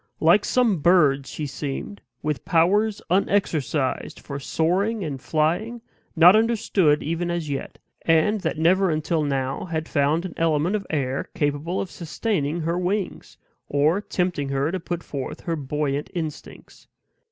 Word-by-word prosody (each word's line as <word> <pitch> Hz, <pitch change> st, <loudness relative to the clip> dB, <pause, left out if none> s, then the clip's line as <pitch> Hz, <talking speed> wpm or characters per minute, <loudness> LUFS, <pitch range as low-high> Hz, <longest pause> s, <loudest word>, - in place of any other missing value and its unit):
Like 170 Hz, +6 st, +4 dB
some 235 Hz, -8 st, +2 dB
bird 145 Hz, -5 st, +4 dB
she 150 Hz, -, -5 dB
seemed, 145 Hz, +8 st, -5 dB, 0.2 s
with 150 Hz, -2 st, -2 dB
powers 200 Hz, +6 st, +2 dB
unexercised 160 Hz, -8 st, 0 dB
for 140 Hz, -1 st, -6 dB
soaring 190 Hz, +9 st, 0 dB
and 140 Hz, -5 st, -5 dB
flying, 175 Hz, -, 0 dB, 0.4 s
not 175 Hz, +4 st, +8 dB
understood 215 Hz, -9 st, +2 dB
even 165 Hz, +3 st, -2 dB
as 170 Hz, -4 st, -2 dB
yet, 135 Hz, -, -5 dB, 0.2 s
and 180 Hz, +6 st, +2 dB
that -, -, -2 dB
never 185 Hz, +4 st, +3 dB
until 155 Hz, +1 st, 0 dB
now 135 Hz, -2 st, -2 dB
had 160 Hz, -2 st, -3 dB
found 150 Hz, +4 st, +1 dB
an 180 Hz, -, -6 dB
element 165 Hz, +3 st, +1 dB
of 200 Hz, -2 st, -4 dB
air 135 Hz, -3 st, -2 dB
capable 145 Hz, +5 st, -1 dB
of 185 Hz, -, -4 dB
sustaining 170 Hz, -2 st, -2 dB
her 170 Hz, +2 st, -1 dB
wings, 185 Hz, +2 st, -3 dB, 0.3 s
or 150 Hz, +7 st, +2 dB
tempting 180 Hz, -8 st, -2 dB
her 140 Hz, +3 st, 0 dB
to 190 Hz, -, -2 dB
put 175 Hz, 0 st, -4 dB
forth 140 Hz, -2 st, -6 dB
her 165 Hz, -, -2 dB
buoyant 145 Hz, 0 st, -2 dB
instincts. 160 Hz, -4 st, -7 dB
165 Hz, 145 wpm, -24 LUFS, 145-185 Hz, 0.4 s, not